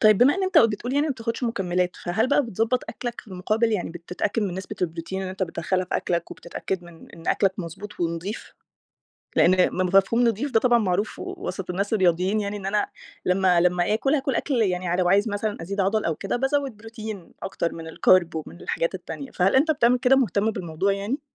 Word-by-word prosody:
طيب 215 -2 +6
بما 265 +4 +6
إن 390 - -2
أنت 375 0 +4
بتقول 230 +2 +2
يعني 290 +2 +2
ما 295 - 0
بتاخُدش 230 -1 -4
مُكمِّلات، 180 -6 0
فهل 220 +8 0
بقى 285 - +4
بتضبط 230 +1 0
أكلك؟ 240 -1 -5
في - - -19
المقابل 215 +5 0
يعني 180 -5 -1
بتتأكد 180 +6 -3
من 190 -4 -2
نسبة 190 0 -6
البروتين 170 +2 -3
اللي 185 - -4
أنت 190 +1 -4
بتدخّلها 185 +1 -1
في 180 - -1
أكلك، 170 -1 -2
وبتتأكد 180 +1 -5
من 170 -1 -14
إن 165 0 -9
أكلك 195 -1 +3
مضبوط 195 +4 -7
ونضيف؟ 170 +5 -3 0.8
لإن 185 +1 +5
م 185 0 0
مفهوم 230 +5 +4
نضيف 230 +6 -1
ده 225 - +4
طبعًا 240 -1 +4
معروف 205 -1 -1
وسط 375 - -5
الناس 200 +4 -2
الرياضيّين، 185 +1 +2
يعني 205 0 -3
إن 195 -2 -6
أنا 205 +1 +1 0.4
لمّا 185 -1 +3
لمّا 180 +2 +2
آكُل 270 +6 +1
هاكُل 270 -3 0
أكل 275 +4 -1
يعني 180 -3 0
ع 170 - +1
لو 180 0 +2
عايز 200 +4 +4
مثلًا 205 -2 -3
أزيد 200 +4 -3
عضَل 210 +3 +1
أو 165 - 0
كده، 195 +8 -3
بازوِّد 270 -1 0
بروتين 215 -4 -8
أكتر 170 -3 -2
من 165 -1 -7
الCarb 175 +1 +4
ومن 160 +2 -6
الحاجات - - -1
التانية، 275 - -7
فهل 190 +7 +2
أنت 310 +4 +4
بتعمل 250 -4 +3
كده، 255 +2 +4
مُهتم 220 -4 +2
بالموضوع 185 -1 -1
يعني؟ 205 +9 -2
200 Hz, 205 wpm, -24 LUFS, 180-230 Hz, 0.8 s, طيب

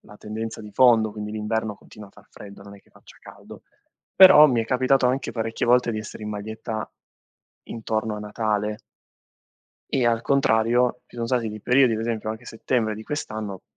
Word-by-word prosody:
la 105 - -16
tendenza 110 +1 -6
di 105 -1 -10
fondo. 115 -4 +4
Quindi 105 0 -6
l'inverno 110 0 -3
continua 105 0 -14
a - - -23
far 105 0 -20
freddo, 100 -1 -13
non 100 0 -12
è - - -19
che - - -31
faccia - - -19
caldo. - - -14 0.5
Però 185 -5 +9
mi 120 -4 +1
è - - -6
capitato 130 +1 +2
anche 130 +1 -1
parecchie 115 0 -3
volte 125 0 +3
di 110 - -3
essere 110 0 -9
in - - -5
maglietta 110 +1 -6 0.7
intorno 110 -1 -3
a - - -6
Natale. 105 0 -3 1.1
E 125 -3 +1
al 115 -1 +1
contrario, 125 -2 +1
ci - - -18
son 115 -1 -3
stati 120 -3 -1
dei 105 0 -7
periodi, 125 -1 +3
per 110 - -3
esempio 110 -2 -3
anche 110 +3 -8
settembre 115 -1 -2
di 110 - -9
quest'anno, 110 -8 -6
110 Hz, 185 wpm, -23 LUFS, 105-120 Hz, 1.1 s, Però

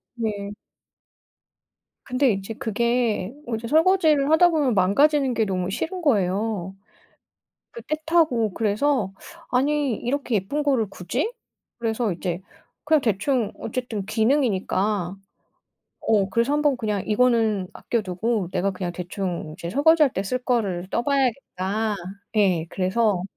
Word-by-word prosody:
네. 205 -3 -3 1.5
근데 255 -1 +2
이제 195 +3 -4
그게 235 -1 0
어제 230 0 -3
설거지를 315 -2 +4
하다 350 +2 +6
보면 290 -7 +1
망가지는 270 +8 +3
게 225 -2 +1
너무 185 -1 -2
싫은 360 - -3
거예요. 200 - 0 1.0
그 475 - -9
때 310 - -2
타고 260 - +2
그래서 220 0 +1 0.4
'아니 280 0 +1
이렇게 255 -2 -2
예쁜 205 +10 -1
거를 255 -7 +2
굳이?' 260 - -2 0.5
그래서 225 -2 0
이제 175 0 -3 0.5
그냥 305 -2 +4
대충 225 +1 0
어쨌든 225 -4 -4
기능이니까 210 -5 +1 0.8
어 200 -3 +2
그래서 235 +7 +1
한번 295 -3 +2
그냥 210 -4 -2
이거는 220 -4 +2
아껴 235 -2 -2
두고 195 +1 -1
'내가 195 +2 0
그냥 185 -2 -4
대충 180 -3 -4
이제 170 - -5
설거지할 295 - +4
때 190 - -2
쓸 255 +6 -1
거를 195 -8 0
떠봐야겠다.' 225 -6 0 0.4
예 180 -6 +3
그래서 190 0 +1
225 Hz, 265 characters per minute, -24 LUFS, 195-275 Hz, 1.5 s, 하다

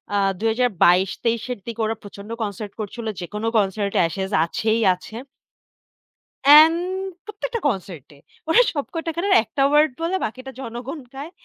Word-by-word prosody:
আ - - +3 0.2
২০২২-২৩ 225 -1 +2
এর 210 - -11
দিকে 230 -1 -4
ওরা 225 +1 -1
প্রচন্ড 200 +1 -11
কনসার্ট 205 0 -5
করছিল। 225 +3 -6 0.2
যেকোনো 210 +5 -4
কনসার্ট 200 0 0
এ - - +5
Ashes 190 +4 -4
আছেই 220 +6 0
আছে। 220 +4 -13 1.3
অ্যান্ড 310 +3 +9 0.5
প্রত্যেকটা 450 +3 -4
কনসার্ট 180 - -6
এ। - - -21 0.3
ওরা 440 +9 +6
সব 285 -2 -2
কয়টা 330 0 -3
গানের 385 +3 +1
১ 215 - -23
টা 275 - +4
ওয়ারড 300 +1 +4
বলে, 345 +3 0
বাকিটা 255 +4 -7
জনগণ 245 +5 -6
গায়। 285 +5 -7
230 Hz, 150 wpm, -22 LUFS, 200-290 Hz, 1.3 s, অ্যান্ড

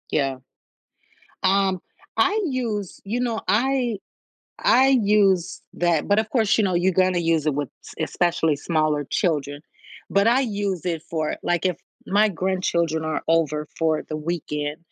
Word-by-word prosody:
Yeah. 135 -3 0 1.0
Um, 190 -1 +2 0.4
I 405 +4 +3
use, 230 - -3
you 220 +5 -2
know, 235 -3 -1
I 245 -1 +1 0.7
I 270 - +5
use 200 -4 +2
that, 170 -3 +1
but 205 +1 +3
of 220 0 -2
course, 220 -5 +2
you 220 - +3
know, 185 -3 +1
you 180 +2 +2
gonna 185 0 +2
use 165 -2 +1
it 150 - +2
with 145 -2 -2
s - - -11 0.2
especially 165 -3 +1
smaller 155 -1 0
children, 145 -5 -1 0.5
but 200 +2 +3
I 245 +3 +4
use 200 - -2
it 165 -3 -1
for, 155 -2 -1
like, 175 +1 0
if 180 -4 +1 0.3
my 210 +2 +3
grandchildren 170 -4 -1
are 155 0 -2
over 155 -2 +1
for 160 -1 +1
the 155 - -4
weekend 150 -2 -3
180 Hz, 155 wpm, -23 LUFS, 155-210 Hz, 1.0 s, I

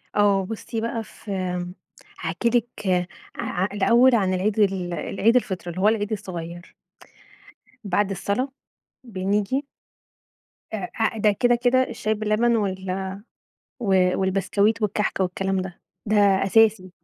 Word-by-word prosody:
آه 200 -2 +3
بُصي 225 +2 -5
بقى، 230 0 -2
في 210 - -11
إمم، 180 -1 -3 0.5
هاحكي 235 - -1
لِك 235 -3 -1 0.5
آآ، 185 +2 -1
الأوّل 235 +5 +5
عن 190 -4 +2
العيد 200 +4 0
ال 190 -4 +1
العيد 220 +6 +1
الفطر 190 -7 0
اللي 180 +2 -4
هو 205 - +4
العيد 215 -1 +1
الصغيّر. 175 -4 -6 1.1
بعد 200 +1 0
الصلا 200 +7 -1 0.6
بنيجي 205 +6 -1 1.1
آآ، 220 +3 -2
ده 210 0 +4
كده 240 +4 +3
كده 250 +2 +3
الشاي 215 -3 -2
باللبن 215 +2 +1
وال 190 -2 -2 1.1
والبسكويت 200 +3 +1
والكحك 210 -1 0
والكلام 190 +1 0
ده، 185 -2 -9 0.3
ده 215 +1 +2
أساسي 200 0 +4
205 Hz, 120 wpm, -24 LUFS, 190-225 Hz, 1.1 s, الأوّل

